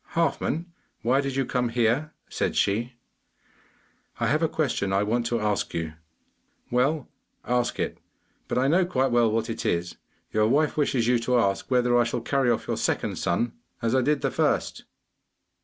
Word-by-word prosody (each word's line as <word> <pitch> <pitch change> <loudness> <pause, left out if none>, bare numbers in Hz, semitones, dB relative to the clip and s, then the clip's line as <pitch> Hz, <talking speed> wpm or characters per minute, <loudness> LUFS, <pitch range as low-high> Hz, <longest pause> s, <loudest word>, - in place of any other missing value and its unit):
'Halfman, 165 0 0 0.4
why 130 +4 +3
did 140 -1 -3
you 135 -1 +1
come 125 -1 0
here?' 120 +6 +1 0.2
said - - -2
she. 115 +5 +1 1.3
'I - - +1
have 155 +2 +2
a 165 - +2
question 125 -10 -1
I 100 +1 +2
want 115 +3 0
to 120 -1 0
ask 105 -1 -1
you.' 80 -2 -3 0.8
'Well, 130 +3 +1 0.4
ask 125 0 0
it; - - -2 0.5
but - - -2
I 130 +2 +3
know 175 +6 +4
quite 135 -7 0
well 120 -2 +3
what 110 0 0
it 115 - -4
is. 85 0 -1 0.4
Your 110 0 +3
wife 145 +5 +2
wishes 135 -5 +1
you 125 -1 +3
to 125 +1 +1
ask 100 -4 0
whether 125 -1 +3
I - - +5
shall 120 0 -2
carry 135 -3 +1
off 115 - 0
your - - -1
second - - -1
son 120 -1 0 0.3
as 115 -1 0
I 130 - +4
did 145 +2 +1
the - - 0
first. - - 0
125 Hz, 180 wpm, -26 LUFS, 115-135 Hz, 1.3 s, I